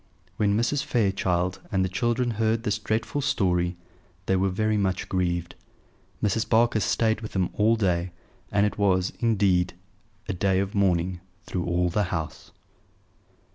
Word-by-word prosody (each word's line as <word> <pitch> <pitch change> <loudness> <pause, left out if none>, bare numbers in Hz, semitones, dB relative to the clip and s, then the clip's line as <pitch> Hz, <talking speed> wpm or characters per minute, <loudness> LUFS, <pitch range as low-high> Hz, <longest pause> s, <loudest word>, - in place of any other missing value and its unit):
When 105 -1 +2
Mrs. 135 +5 +1
Fairchild 95 -6 0
and 95 -2 +2
the - - 0
children 120 +6 0
heard 110 +1 0
this 105 0 0
dreadful 110 +6 -1
story 90 -10 +1 0.5
they 95 - +2
were 95 +1 +2
very 110 +3 0
much 95 -3 0
grieved. 85 -2 -1 0.7
Mrs. 110 +2 0
Barker 115 -1 +3
stayed 110 +1 +1
with 110 - -7
them 95 -2 0
all 110 +2 +3
day; 90 -5 0 0.4
and 100 0 +3
it 105 - -2
was, 95 -2 +2
indeed, 95 -6 +2 0.5
a - - -1
day 95 +1 +1
of 100 +1 -2
mourning 90 -2 +1 0.3
through 90 -2 -3
all 90 0 +1
the 105 +3 +1
house. 85 -4 -5
100 Hz, 150 wpm, -26 LUFS, 90-110 Hz, 0.7 s, Barker